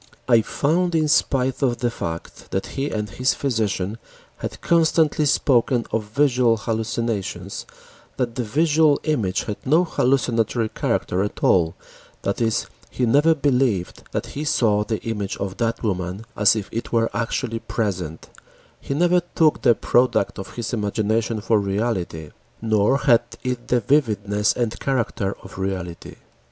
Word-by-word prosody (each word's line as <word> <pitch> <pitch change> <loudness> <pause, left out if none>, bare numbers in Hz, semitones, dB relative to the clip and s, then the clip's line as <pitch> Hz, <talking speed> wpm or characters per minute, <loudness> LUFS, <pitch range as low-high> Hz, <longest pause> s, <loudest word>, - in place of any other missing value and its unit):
I 115 -2 +5
found 170 +9 0
in 155 -1 +2
spite 135 -3 +1
of 125 -3 +1
the 120 -2 -1
fact 85 -6 -6
that 95 - -2
he 140 +1 -2
and 105 -1 -2
his 130 +7 0
physician 110 -5 -1 0.4
had - - -6
constantly 160 -2 +2
spoken 125 -3 +2
of 110 -1 -1
visual 125 0 +2
hallucinations 115 -2 -3 0.5
that 120 -2 -1
the 125 - -2
visual 150 +5 +3
image 110 - 0
had 105 - -4
no 160 +6 +4
hallucinatory 120 -6 +1
character 90 -3 -1
at 105 - -4
all, 85 -3 +3 0.5
that - - -1
is, 115 -2 +1 0.2
he 125 - -1
never 145 +7 +4
believed 125 - 0
that - - -2
he 145 - -3
saw 110 -8 +2
the 110 0 -3
image 105 -4 -3
of 95 -1 -4
that 115 0 -1
woman 95 0 -2
as 105 +1 +4
if 105 -3 -3
it 115 - -4
were 115 -1 +2
actually 115 0 -2
present, 90 -9 -3 0.5
he 140 - -4
never 175 +3 +3
took 155 -2 +3
the 120 - +5
product 120 -6 +1
of 95 - -8
his 120 0 -4
imagination 110 +1 0
for 110 0 +2
reality, 95 -6 -2 0.3
nor 110 +3 +2
had 125 -5 +4 0.2
it 125 -2 -3
the 125 - +3
vividness 105 -5 +2
and 120 -3 -2
character 115 -7 -1
of 95 0 -11
reality. 90 -3 -4
115 Hz, 150 wpm, -22 LUFS, 105-135 Hz, 0.5 s, I